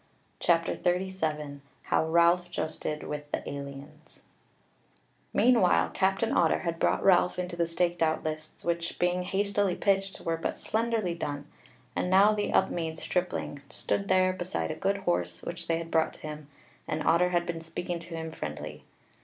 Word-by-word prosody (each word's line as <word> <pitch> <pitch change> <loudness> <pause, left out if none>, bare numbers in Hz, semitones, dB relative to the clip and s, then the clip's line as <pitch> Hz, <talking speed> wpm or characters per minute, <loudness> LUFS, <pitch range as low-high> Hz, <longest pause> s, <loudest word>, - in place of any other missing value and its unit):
CHAPTER 165 -1 +2
37 160 -6 -1 0.2
How - - +2
Ralph 170 +2 +4
Justed 155 -2 -3
With 150 0 -5
the - - -3
Aliens 140 0 -8 1.1
Meanwhile 230 -7 +4
Captain 195 +4 +1
Otter - - +3
had 170 -2 -2
brought - - +2
Ralph 180 -1 +4
into 180 -1 -3
the 170 -1 +1
staked 175 +1 0
out 160 -1 +2
lists, 155 0 -6
which, 170 0 -1
being 180 +1 +1
hastily 200 0 +1
pitched, 195 -1 +1
were 165 0 -1
but 165 - -3
slenderly 220 -5 0
done, 145 -3 -4 0.5
and 180 - 0
now 195 +3 +6
the 210 -1 -1
Upmeads 160 -2 0
stripling 180 -5 -2
stood 200 - -2
there 185 0 +4
beside 180 -2 -2
a - - -4
good 200 +5 0
horse 85 - -1
which 170 0 -6
they 165 - +2
had 165 0 -6
brought 160 -1 +2
to - - -15
him, 150 -1 -7 0.4
and 155 - -2
Otter 180 +2 +4
had 175 -1 +1
been 165 -1 -4
speaking 170 +1 -4
to 170 0 -8
him 160 0 -4
friendly. 75 - -6
170 Hz, 160 wpm, -29 LUFS, 160-185 Hz, 1.1 s, now